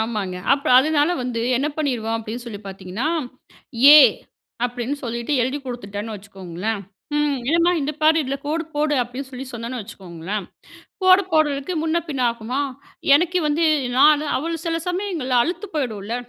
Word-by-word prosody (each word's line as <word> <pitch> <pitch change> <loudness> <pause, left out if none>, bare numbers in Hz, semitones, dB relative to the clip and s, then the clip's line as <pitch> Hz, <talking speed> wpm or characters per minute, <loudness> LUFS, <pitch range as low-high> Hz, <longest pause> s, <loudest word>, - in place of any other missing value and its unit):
ஆமாங்க 210 -5 -2 0.2
அப்ப 275 0 0
அதனால 300 +3 +3
வந்து 245 -2 -3 0.2
என்ன 275 - 0
பண்ணிருவோம் 240 -7 -1
அப்டின்னு 225 +2 -6
சொல்லி 210 -3 -7
பார்த்தீங்கன்னா? 195 +7 -4 0.9
ஏ - - +11 0.7
அப்டின்னு 245 +3 -3
சொல்லிட்டு 235 +3 -3
எழுதிக் 275 +3 -3
கொடுத்துட்டேன்னு 220 -3 -5
வச்சுக்கோங்களேன், 195 +1 -5 0.4
ம் 295 -1 +1
என்னம்மா 335 +2 +3
இந்த 295 +2 -2
பாரு, 310 +1 +5
இதில 270 +1 -2
கோடு 320 +2 -1
போடு 295 0 +1
அப்டின்னு 255 +3 -7
சொல்லி 260 0 -7
சொன்னேன்னு 235 +1 -5
வச்சுக்கோங்களேன், 190 +1 -6 0.6
கோடு 370 +1 +6
போடுறதுக்கு 295 +1 +1
முன்ன 325 +1 +1
பின்ன 275 -4 -2
ஆகுமா? 235 +4 -4 0.5
எனக்கு 350 +4 +2
வந்து 300 +3 +1 0.3
நான் 300 +1 +6
அவள் 330 +4 -2
சில 330 -1 0
சமயங்கள்ல 355 -9 -1
அழுத்து 360 - -3
போயிடும்ல, 225 -7 -3
260 Hz, 145 wpm, -22 LUFS, 225-305 Hz, 0.9 s, ஏ